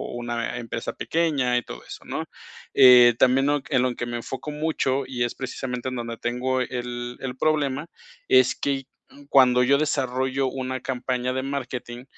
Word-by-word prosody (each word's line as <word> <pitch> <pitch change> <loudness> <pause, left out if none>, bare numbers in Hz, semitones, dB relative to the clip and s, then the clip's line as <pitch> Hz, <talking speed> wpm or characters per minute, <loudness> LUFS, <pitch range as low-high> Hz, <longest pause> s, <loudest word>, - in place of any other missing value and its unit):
o - - -6
una 120 -1 -3
empresa 115 -1 -5
pequeña 140 -7 +1
y - - -3
todo - - -9
eso, - - -10
¿no?, - - -3 0.5
eh, 125 -3 +8
también 130 +1 +4
en 135 - +1
lo - - -2
en 130 -4 +2
lo 125 -1 0
que 120 - -4
me 120 - -4
enfoco 130 +5 -6
mucho, 150 -3 0
y 125 -2 -2
es 120 - -3
precisamente, 130 -1 -4
en 130 - -5
donde 115 -1 -4
tengo 125 +2 -1
el 120 0 -5
el 130 -1 -5
problema, 150 0 0 0.4
es 130 -1 +5
que, 135 -1 -1 0.3
mm, 145 0 -16
cuando 125 -2 +5
yo 140 +3 +4
desarrollo 130 -2 0
una 130 -1 -3
campaña 125 -1 -2
de 130 - -1
marketing, 125 -3 -5
130 Hz, 180 wpm, -24 LUFS, 120-135 Hz, 0.5 s, eh